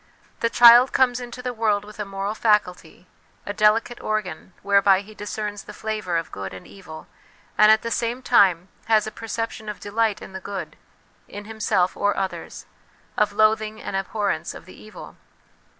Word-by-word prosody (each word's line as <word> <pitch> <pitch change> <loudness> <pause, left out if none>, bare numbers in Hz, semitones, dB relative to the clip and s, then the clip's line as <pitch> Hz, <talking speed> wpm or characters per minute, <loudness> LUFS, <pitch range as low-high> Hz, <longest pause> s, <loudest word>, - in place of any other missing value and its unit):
The 230 - +1
child 240 +2 +7
comes 250 -2 +2
into 245 0 -8
the 250 -1 -3
world 215 -3 0
with 210 0 -14
a 210 - -3
moral 195 +1 -4
faculty, 195 -6 0 0.4
a 205 - -4
delicate 215 +3 +2
organ 190 -5 -4
whereby 200 -1 +4
he 215 +2 -14
discerns 210 0 -5
the - - -12
flavour 215 -6 -3
of 165 - -4
good 95 -1 -7
and 95 - -11
evil, 170 -5 -12 0.5
and 215 0 +6
at 220 - +3
the 230 - -4
same 240 +2 -2
time 190 -7 +3 0.2
has 220 -1 +3
a 220 - -5
perception 225 -1 -5
of 210 - -7
delight 210 0 -1
in 190 - -11
the 190 - -6
good 195 0 -6 0.5
in 205 0 -9
himself 210 -4 0
or 205 0 0
others, 190 -1 -5 0.5
of 210 -1 +1
loathing 215 +1 +1
and - - -6
abhorrence 195 -4 -2
of - - -12
the 185 - -14
evil. 215 - -13
210 Hz, 175 wpm, -23 LUFS, 195-220 Hz, 0.5 s, child